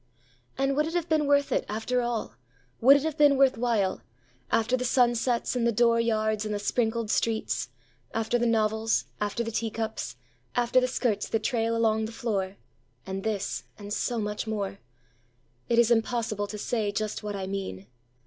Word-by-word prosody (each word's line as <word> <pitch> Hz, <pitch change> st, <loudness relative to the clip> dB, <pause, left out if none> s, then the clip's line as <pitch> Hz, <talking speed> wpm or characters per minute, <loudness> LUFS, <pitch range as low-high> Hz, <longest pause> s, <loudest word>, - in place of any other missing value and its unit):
And 270 Hz, 0 st, +1 dB
would 300 Hz, +2 st, +2 dB
it 330 Hz, -, -5 dB
have 345 Hz, -1 st, 0 dB
been 310 Hz, -3 st, +2 dB
worth 285 Hz, 0 st, +3 dB
it, -, -, +1 dB
after 225 Hz, +4 st, -1 dB
all, 240 Hz, -2 st, -2 dB, 0.5 s
Would 270 Hz, +4 st, +8 dB
it 285 Hz, -, -3 dB
have 315 Hz, -1 st, -3 dB
been 290 Hz, -2 st, +6 dB
worth 270 Hz, -1 st, +5 dB
while, 225 Hz, -5 st, 0 dB, 0.5 s
After 230 Hz, +2 st, +2 dB
the 250 Hz, -, -2 dB
sunsets 240 Hz, -1 st, +2 dB
and 235 Hz, -1 st, +1 dB
the -, -, +3 dB
dooryards 225 Hz, -2 st, +2 dB
and 215 Hz, -, -3 dB
the -, -, 0 dB
sprinkled 225 Hz, +1 st, 0 dB
streets, 220 Hz, -, 0 dB, 0.4 s
After 225 Hz, +2 st, 0 dB
the 240 Hz, -, +2 dB
novels, 220 Hz, 0 st, +1 dB
after 210 Hz, +3 st, -1 dB
the 230 Hz, -, -4 dB
teacups, 220 Hz, -, -3 dB, 0.4 s
after 245 Hz, +1 st, +3 dB
the 255 Hz, -, +1 dB
skirts 235 Hz, -5 st, -1 dB
that 225 Hz, -, -1 dB
trail 230 Hz, -2 st, 0 dB
along 220 Hz, -1 st, +2 dB
the 220 Hz, -, -6 dB
floor—And 195 Hz, -3 st, -5 dB
this, 210 Hz, -3 st, -2 dB
and 205 Hz, -1 st, -6 dB
so 240 Hz, +2 st, -1 dB
much 210 Hz, 0 st, -3 dB
more?—It 125 Hz, -, -6 dB
is 235 Hz, 0 st, +5 dB
impossible 225 Hz, -2 st, 0 dB
to 210 Hz, -, -6 dB
say 210 Hz, -1 st, -1 dB
just 215 Hz, +1 st, -3 dB
what 210 Hz, -1 st, -4 dB
I 195 Hz, -1 st, -3 dB
mean! 190 Hz, -, -5 dB
225 Hz, 170 wpm, -27 LUFS, 205-240 Hz, 0.5 s, Would